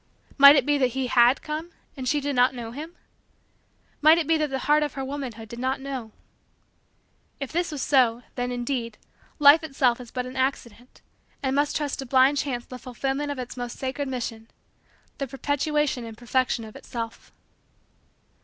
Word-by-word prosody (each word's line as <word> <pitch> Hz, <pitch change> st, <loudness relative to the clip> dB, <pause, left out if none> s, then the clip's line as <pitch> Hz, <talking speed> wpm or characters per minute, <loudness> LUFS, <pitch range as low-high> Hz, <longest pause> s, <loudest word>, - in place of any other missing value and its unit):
Might 280 Hz, +1 st, +9 dB
it 275 Hz, -4 st, +3 dB
be 290 Hz, -1 st, +2 dB
that 255 Hz, -1 st, 0 dB
he 265 Hz, -, 0 dB
had 245 Hz, +1 st, +4 dB
come 310 Hz, +3 st, -4 dB, 0.3 s
and 260 Hz, -3 st, -3 dB
she 295 Hz, -, +2 dB
did 285 Hz, -1 st, -2 dB
not 250 Hz, +1 st, +3 dB
know 230 Hz, -2 st, -6 dB
him? 315 Hz, +7 st, -8 dB, 1.1 s
Might 310 Hz, +2 st, +7 dB
it 335 Hz, -, 0 dB
be 325 Hz, +2 st, +3 dB
that 305 Hz, -1 st, 0 dB
the 270 Hz, -, -2 dB
heart 300 Hz, +1 st, +4 dB
of 295 Hz, -3 st, -1 dB
her 270 Hz, -1 st, -3 dB
womanhood 260 Hz, -5 st, -6 dB
did 235 Hz, +2 st, -9 dB
not 260 Hz, +2 st, -1 dB
know? 265 Hz, -5 st, -6 dB, 1.3 s
If 275 Hz, -2 st, -5 dB
this 345 Hz, +1 st, -1 dB
was 295 Hz, -3 st, -3 dB
so 245 Hz, -4 st, +3 dB
then, 245 Hz, 0 st, -3 dB
indeed, 240 Hz, -2 st, -3 dB, 0.4 s
Life 295 Hz, +2 st, +7 dB
itself 260 Hz, -5 st, +1 dB
is 240 Hz, -, -11 dB
but 250 Hz, +1 st, -4 dB
an 255 Hz, +1 st, -8 dB
accident 255 Hz, -2 st, -3 dB, 0.4 s
and 265 Hz, 0 st, 0 dB
must 290 Hz, +1 st, +1 dB
trust 295 Hz, -2 st, -2 dB
to 270 Hz, -, -5 dB
blind 265 Hz, +3 st, +4 dB
chance 250 Hz, -4 st, -3 dB
the 255 Hz, -, -9 dB
fulfillment 270 Hz, +3 st, -3 dB
of 285 Hz, -, -5 dB
its 250 Hz, -1 st, -6 dB
most 245 Hz, -1 st, -6 dB
sacred 275 Hz, +2 st, -3 dB
mission 230 Hz, -3 st, -5 dB, 0.7 s
the 275 Hz, -, -2 dB
perpetuation 285 Hz, 0 st, -1 dB
and 225 Hz, -1 st, -9 dB
perfection 245 Hz, -1 st, 0 dB
of 215 Hz, -, -12 dB
itself. 230 Hz, -1 st, -7 dB
265 Hz, 180 wpm, -25 LUFS, 245-285 Hz, 1.3 s, Might